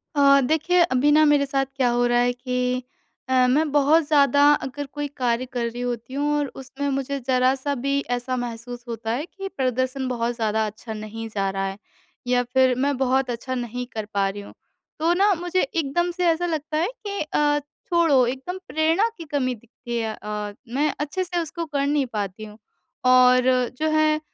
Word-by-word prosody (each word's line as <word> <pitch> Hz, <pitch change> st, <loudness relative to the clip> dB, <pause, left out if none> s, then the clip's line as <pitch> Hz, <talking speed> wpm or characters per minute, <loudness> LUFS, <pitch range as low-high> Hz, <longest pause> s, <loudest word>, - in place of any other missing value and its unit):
अ, 275 Hz, -1 st, +6 dB
देखिए 315 Hz, +6 st, +2 dB
अभी 290 Hz, -3 st, +3 dB
ना 305 Hz, +1 st, +6 dB
मेरे 295 Hz, -1 st, +4 dB
साथ 270 Hz, 0 st, 0 dB
क्या 260 Hz, -3 st, +2 dB
हो 240 Hz, 0 st, +2 dB
रहा 240 Hz, 0 st, +3 dB
है 245 Hz, 0 st, +2 dB
कि 250 Hz, 0 st, -2 dB, 0.5 s
अ, 255 Hz, -1 st, +4 dB
मैं 295 Hz, +4 st, +2 dB
बहुत 295 Hz, +3 st, +4 dB
ज़्यादा 285 Hz, -2 st, +4 dB, 0.2 s
अगर 285 Hz, +2 st, -6 dB
कोई 290 Hz, +1 st, -5 dB
कार्य 245 Hz, -1 st, 0 dB
कर 245 Hz, -2 st, -3 dB
रही 235 Hz, +1 st, -4 dB
होती 245 Hz, 0 st, -4 dB
हूँ 290 Hz, +2 st, 0 dB
और 290 Hz, -1 st, 0 dB
उसमें 270 Hz, +2 st, -5 dB
मुझे 275 Hz, 0 st, -2 dB
ज़रा-सा 260 Hz, +2 st, +2 dB
भी 275 Hz, +1 st, +1 dB
ऐसा 245 Hz, +1 st, -1 dB
महसूस 245 Hz, 0 st, -6 dB
होता 225 Hz, -1 st, -4 dB
है 270 Hz, +6 st, -2 dB
कि 390 Hz, +2 st, -8 dB
प्रदर्शन 260 Hz, +1 st, -1 dB
बहुत 240 Hz, -1 st, -1 dB
ज़्यादा 220 Hz, -1 st, 0 dB
अच्छा 220 Hz, +2 st, -8 dB
नहीं 215 Hz, +1 st, -6 dB
जा 195 Hz, -2 st, -1 dB
रहा 195 Hz, 0 st, -2 dB
है 195 Hz, 0 st, -4 dB, 0.5 s
या 245 Hz, 0 st, +3 dB
फिर 260 Hz, -1 st, +4 dB
मैं 280 Hz, +3 st, 0 dB
बहुत 265 Hz, 0 st, +1 dB
अच्छा 245 Hz, +2 st, -3 dB
नहीं 245 Hz, 0 st, -4 dB
कर 220 Hz, -1 st, -3 dB
पा 200 Hz, -1 st, +2 dB
रही 205 Hz, +1 st, -6 dB
हूँ। 200 Hz, -, -12 dB, 0.5 s
तो 330 Hz, +2 st, +3 dB
ना 395 Hz, +3 st, +4 dB
मुझे 355 Hz, +1 st, 0 dB
एकदम 325 Hz, +4 st, 0 dB
से 355 Hz, +1 st, -2 dB
ऐसा 335 Hz, +1 st, +2 dB
लगता 310 Hz, -2 st, -2 dB
है 330 Hz, +3 st, +1 dB, 0.2 s
कि 400 Hz, -1 st, -3 dB
अ, 295 Hz, -1 st, +1 dB, 0.3 s
छोड़ो 330 Hz, -7 st, +4 dB
एकदम 265 Hz, +9 st, -4 dB
प्रेरणा 325 Hz, +7 st, +2 dB
की 335 Hz, -, -7 dB
कमी 255 Hz, -3 st, 0 dB
दिखती 235 Hz, +1 st, -7 dB
है 225 Hz, -1 st, -2 dB
अ, 210 Hz, -1 st, -4 dB
मैं 280 Hz, +6 st, 0 dB
अच्छे 300 Hz, +6 st, -2 dB
से 355 Hz, -1 st, -2 dB
उसको 335 Hz, +1 st, -5 dB
कर 285 Hz, -3 st, -1 dB
नहीं 290 Hz, -1 st, +1 dB
पाती 205 Hz, 0 st, -4 dB
हूँ। 210 Hz, 0 st, -12 dB, 0.5 s
और 255 Hz, 0 st, +5 dB
जो 315 Hz, 0 st, +1 dB
है 310 Hz, 0 st, +3 dB
260 Hz, 195 wpm, -23 LUFS, 240-295 Hz, 0.5 s, अ